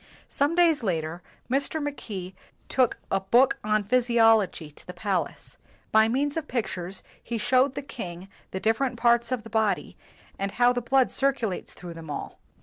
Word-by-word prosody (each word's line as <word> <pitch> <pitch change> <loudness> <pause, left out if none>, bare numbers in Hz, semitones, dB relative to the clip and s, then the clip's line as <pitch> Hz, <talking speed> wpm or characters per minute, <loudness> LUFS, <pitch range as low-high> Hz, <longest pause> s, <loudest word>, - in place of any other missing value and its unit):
Some 290 +4 +1
days 335 -5 +4
later, 170 -4 -2 0.3
Mr. 275 +5 +1
Mackay 210 -11 -5 0.4
took 255 -3 +2
a - - +2
book 240 +8 +3
on 215 0 +1
physiology 225 -7 +3
to - - -15
the 180 - -8
palace. 195 -1 -3 0.3
By 220 0 +5
means 280 +5 0
of 320 -2 -3
pictures, 190 -6 -3 0.2
he 235 - -4
showed 255 +4 +2
the - - -4
king 185 -8 -7 0.2
the 190 - -4
different 235 +4 0
parts 235 0 +3
of 250 -4 -1
the 225 - -12
body, 220 -4 0 0.4
and 195 0 -2
how 245 0 +4
the 245 - -1
blood 265 +2 +3
circu 270 -5 +1
lates 180 - -6
through 175 -1 -9
them 165 -2 -10
all. 145 - -6
225 Hz, 170 wpm, -26 LUFS, 190-255 Hz, 0.4 s, By